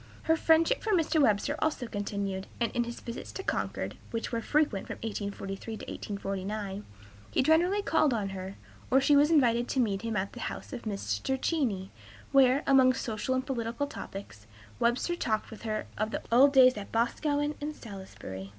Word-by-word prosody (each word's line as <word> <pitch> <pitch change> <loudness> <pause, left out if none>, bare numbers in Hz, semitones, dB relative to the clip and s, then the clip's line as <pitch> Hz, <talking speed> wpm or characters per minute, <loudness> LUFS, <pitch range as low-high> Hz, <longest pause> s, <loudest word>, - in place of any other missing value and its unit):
Her 320 - +3
friendship 330 +9 +3
for 435 - 0
Mr. 325 -3 +3
Webster 225 +4 +2
also 305 -5 0
continued, 200 -3 -3
and 235 -2 +1
in 240 -1 0
his 235 0 -7
visits 235 0 -7
to 385 - -5
Concord, - - -2
which 230 -1 -3
were 230 -1 -1
frequent 295 -8 +1
from - - -5
1843 200 0 -4
to - - -8
1849, 200 0 -4 0.5
he - - +2
generally 350 +7 +3
called 300 - +3
on 210 -5 -1
her, 190 0 -6 0.3
or 265 - +5
she 280 +2 +4
was 290 +2 +5
invited 240 -6 +3
to 265 - -1
meet 200 -5 +1
him 225 -2 -2
at 190 +1 -2
the - - -9
house - - -5
of 245 - -5
Mr. 200 - -2
Cheney, 230 - -1 0.4
where, 270 0 +5
among 260 -2 +6
social 245 0 -2
and 260 0 -1
political 240 0 -2
topics, 195 - -9 0.3
Webster 240 +9 +1
talked 220 -9 -1
with 220 - -10
her 215 -2 -2
of 215 +1 0
the - - -4
old 265 +4 +7
days 255 -3 +6
at 200 - -7
Boscawen 290 +6 0
and 300 +1 -4
Salisbury. 190 - -8
235 Hz, 180 wpm, -29 LUFS, 200-280 Hz, 0.5 s, old